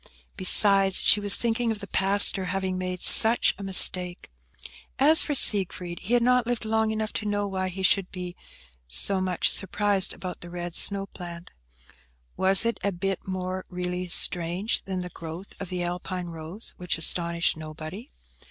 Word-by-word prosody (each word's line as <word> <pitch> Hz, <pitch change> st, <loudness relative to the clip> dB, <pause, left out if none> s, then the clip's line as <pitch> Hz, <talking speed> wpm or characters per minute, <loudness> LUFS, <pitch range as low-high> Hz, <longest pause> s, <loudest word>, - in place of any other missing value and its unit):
Besides, 195 Hz, 0 st, +4 dB
she 210 Hz, -, +4 dB
was 205 Hz, -1 st, +6 dB
thinking 235 Hz, 0 st, -2 dB
of 220 Hz, -, -3 dB
the 200 Hz, -, -7 dB
pastor 195 Hz, 0 st, +3 dB
having 190 Hz, 0 st, -4 dB
made 185 Hz, -1 st, -5 dB
such 225 Hz, +2 st, +6 dB
a -, -, -8 dB
mistake. 180 Hz, -, +3 dB, 0.7 s
As 305 Hz, +4 st, +4 dB
for 295 Hz, -, -3 dB
Siegfried, 180 Hz, -6 st, 0 dB
he 225 Hz, +6 st, -2 dB
had 240 Hz, -, +1 dB
not 250 Hz, -1 st, +1 dB
lived 240 Hz, -2 st, -4 dB
long 220 Hz, 0 st, -1 dB
enough 220 Hz, 0 st, -5 dB
to 215 Hz, -, -5 dB
know 205 Hz, 0 st, -2 dB
why 190 Hz, -1 st, -4 dB
he 190 Hz, +1 st, -7 dB
should 190 Hz, 0 st, 0 dB
be 180 Hz, -1 st, -8 dB, 0.5 s
so 130 Hz, -, +1 dB
much 185 Hz, -2 st, -1 dB
surprised 200 Hz, 0 st, +1 dB
about 180 Hz, -1 st, -9 dB
the 175 Hz, -, -11 dB
red 175 Hz, -1 st, -8 dB
snow 200 Hz, -1 st, 0 dB
plant; 175 Hz, -3 st, -12 dB, 0.8 s
was 190 Hz, +3 st, +4 dB
it 230 Hz, -, -2 dB
a 200 Hz, -, -1 dB
bit 195 Hz, +1 st, -5 dB
more 185 Hz, 0 st, -6 dB
really 180 Hz, 0 st, -5 dB
strange 175 Hz, +4 st, 0 dB
than 190 Hz, -1 st, -5 dB
the 180 Hz, -, -8 dB
growth 170 Hz, +3 st, -11 dB
of 190 Hz, -, -7 dB
the 180 Hz, -1 st, -4 dB
Alpine 180 Hz, 0 st, -6 dB
rose, 165 Hz, +6 st, -5 dB
which 180 Hz, -2 st, -4 dB
astonished 170 Hz, +1 st, 0 dB
nobody? 155 Hz, -, -10 dB
185 Hz, 170 wpm, -24 LUFS, 180-205 Hz, 0.8 s, was